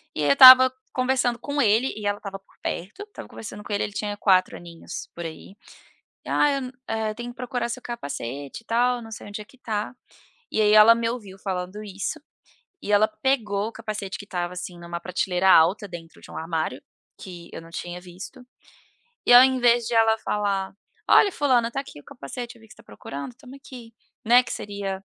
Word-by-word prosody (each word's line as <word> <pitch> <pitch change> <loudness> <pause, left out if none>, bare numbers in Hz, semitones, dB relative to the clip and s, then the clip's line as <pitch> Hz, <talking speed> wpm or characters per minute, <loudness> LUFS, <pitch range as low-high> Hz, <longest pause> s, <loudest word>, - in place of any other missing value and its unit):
E 150 - -2
eu 145 - +3
estava 260 - +10 0.2
conversando 255 -2 0
com 285 0 -2
ele 225 +4 +2
e 210 - -7
ela 205 0 0
estava 195 -2 -7
por 195 - -29
perto, 205 - -5
estava 420 - -11
conversando 210 -1 -9
com 205 - -6
ele 205 - 0
ele 205 - -5
tinha 205 -1 -4
4 185 -3 +2
aninhos. 170 -1 -9
por 170 -1 -6
aí. 165 +4 -9 0.7
"Ah, 295 - +3
eu, 265 -2 -3 0.2
eh, 220 -1 -2
tenho 240 +1 -6
que - - -17
procurar 250 -1 -3
seu 255 +2 -5
capacete 140 - -6
e - - -42
tal. 245 +1 +1
Não 225 0 -11
sei 215 - -9
onde 210 +1 -7
é - - -11
que 260 - -22
tá." 215 -2 -4 0.6
E 220 - +1
aí 210 0 +4
ela 215 +2 +9
me 230 0 -1
ouviu 205 -6 -7
falando 190 +2 -5
isso, 200 -1 -5 0.6
e 210 - -3
ela 210 +1 +5
pegou 215 -2 -1
o - - -10
capacete 215 -3 -6
que 205 - -9
estava, 180 -3 -3
assim, 180 0 -7
em 170 0 -13
uma 170 0 -5
prateleira 185 +1 0
alta 185 +6 +4
dentro 170 -2 -11
de - - -14
um - - -9
armário, 160 -5 -3 0.4
que 175 -3 -10
eu - - -7
não 165 - -15
tinha 175 +1 -6
visto. 185 +7 -11 0.8
E - - +5
ao 245 +1 +11
invés 245 -2 +3
de 235 - -2
ela 225 0 +4
falar: 200 -3 -2 0.4
"Olha, 400 - +6
fulana, 245 -5 +2
tá 270 - -3
aqui 210 - -11
o - - -22
capacete. 235 - -8
Eu - - -19
vi 220 - -18
que 195 - -15
você - - -40
tá - - -15
procurando, 140 - -8
toma 260 +1 -14
aqui", 245 -4 -12 0.3
né. 245 +3 +6
Que - - -7
seria, 200 -2 -5
210 Hz, 210 wpm, -24 LUFS, 185-240 Hz, 0.8 s, ao